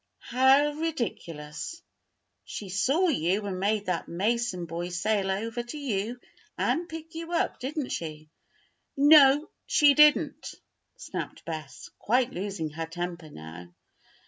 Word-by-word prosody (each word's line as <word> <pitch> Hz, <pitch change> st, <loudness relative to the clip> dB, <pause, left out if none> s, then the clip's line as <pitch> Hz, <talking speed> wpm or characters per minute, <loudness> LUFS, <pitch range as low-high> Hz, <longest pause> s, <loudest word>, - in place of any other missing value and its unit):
"How 265 Hz, +3 st, +5 dB
ridiculous! 255 Hz, -, -4 dB, 0.6 s
She 200 Hz, -, -7 dB
saw 270 Hz, -, +2 dB
you 195 Hz, -, 0 dB
and 190 Hz, -2 st, -3 dB
made 205 Hz, +1 st, 0 dB
that 180 Hz, -2 st, -2 dB
Mason 200 Hz, 0 st, -1 dB
boy 170 Hz, +2 st, -4 dB
sail 195 Hz, +2 st, 0 dB
over 225 Hz, +5 st, -2 dB
to 240 Hz, +5 st, -8 dB
you 240 Hz, -3 st, -2 dB, 0.4 s
and 340 Hz, +1 st, 0 dB
pick 325 Hz, 0 st, -8 dB
you 330 Hz, +1 st, -6 dB
up, 335 Hz, -, 0 dB
didn't 280 Hz, +1 st, -3 dB
she?" 155 Hz, -2 st, -5 dB, 0.7 s
"No, 290 Hz, 0 st, +7 dB, 0.2 s
she 290 Hz, -2 st, +6 dB
didn't!" 300 Hz, +1 st, +4 dB, 0.4 s
snapped -, -, -7 dB
Bess, 155 Hz, -6 st, -7 dB
quite 250 Hz, +3 st, +2 dB
losing 185 Hz, -4 st, -4 dB
her 160 Hz, +1 st, -5 dB
temper 175 Hz, -1 st, -5 dB
now. 80 Hz, -, -10 dB
210 Hz, 125 wpm, -27 LUFS, 170-285 Hz, 0.7 s, No